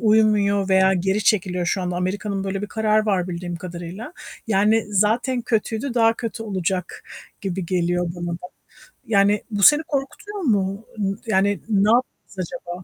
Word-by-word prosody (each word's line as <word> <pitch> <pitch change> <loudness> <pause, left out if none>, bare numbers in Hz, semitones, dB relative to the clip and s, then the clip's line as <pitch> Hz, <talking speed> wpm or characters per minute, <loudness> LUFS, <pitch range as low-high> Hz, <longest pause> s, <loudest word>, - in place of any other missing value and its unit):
uymuyor 210 -3 +3
veya 190 0 +4
geri 190 +3 0
çekiliyor 180 -4 +1
şu 185 0 0
anda. 180 0 -2
Amerika'nın 195 +2 -2
böyle 195 +1 -3
bir - - -2
kararı 215 0 +1
var 185 -3 +1
bildiğim 175 0 -4
kadarıyla. 175 - -7 0.3
Yani, 215 +2 +3
zaten 235 +5 +1
kötüydü, 225 +3 -1
daha 225 -1 +4
kötü 230 -1 -5
olacak 185 -3 -3 0.4
gibi 190 -2 -3
geliyor 175 -1 0
bana 175 0 -4
da. - - -2 0.7
Yani, 205 -1 +3
bu 200 -1 -1
seni 295 +2 +7
korkutuyor 295 +9 -4
mu? 205 - 0
Imm 195 -1 -1
yani, 200 -1 +2
ne 205 0 +3
yapacağız 240 -5 -2 0.3
acaba? 175 +1 -6
200 Hz, 155 wpm, -22 LUFS, 185-220 Hz, 0.7 s, seni